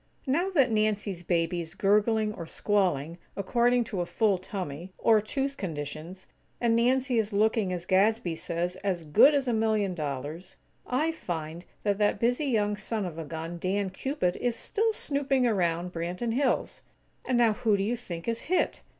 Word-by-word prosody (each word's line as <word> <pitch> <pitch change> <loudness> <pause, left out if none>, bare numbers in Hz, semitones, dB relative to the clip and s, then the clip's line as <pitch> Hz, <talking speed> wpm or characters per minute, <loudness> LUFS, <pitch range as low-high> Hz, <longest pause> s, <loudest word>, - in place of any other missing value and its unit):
Now 325 +8 +1
that 275 -10 +3
Nancy's 210 -4 0
baby 170 0 0
is 165 +2 -9
gurgling 210 +2 +2
or 170 -5 -7
squalling, 175 -6 0 0.2
according 240 +5 +2
to 200 -5 -3
a 175 - -3
full 205 -3 +2
tummy, 180 -2 -6
or 220 -2 +4
tooth 275 +5 -2
conditions; 160 +2 -6 0.3
and 235 -1 +2
Nancy 250 +1 +2
is 220 0 -1
looking, 210 -1 +2
as 175 -1 -4
Gadsby 190 -1 +2
says, 175 +2 -3
"as 185 -4 -2
good 270 - +6
as 275 -2 0
a 245 - +1
million 215 -3 +1
dollars," 150 +3 -5 0.3
I 300 +6 +1
find 170 - -5 0.2
that 205 -1 0
that 205 -1 +2
busy 245 +6 +1
young 210 -6 +1
son 210 0 -3
of 165 -2 -6
a - - -3
gun, 165 +2 -6
Dan 190 +2 -1
Cupid, 190 -4 -1
is 245 -2 -1
still 445 - 0
snooping 280 - 0
around 180 -5 0
Branton 180 +8 -2
Hills. 265 +2 0 0.4
And 255 - 0
now 230 -2 +4
who 210 -1 +1
do 195 - 0
you 225 +4 0
think 175 -8 -7
is 230 0 -1
hit? 365 - +1
205 Hz, 175 wpm, -28 LUFS, 175-235 Hz, 0.4 s, good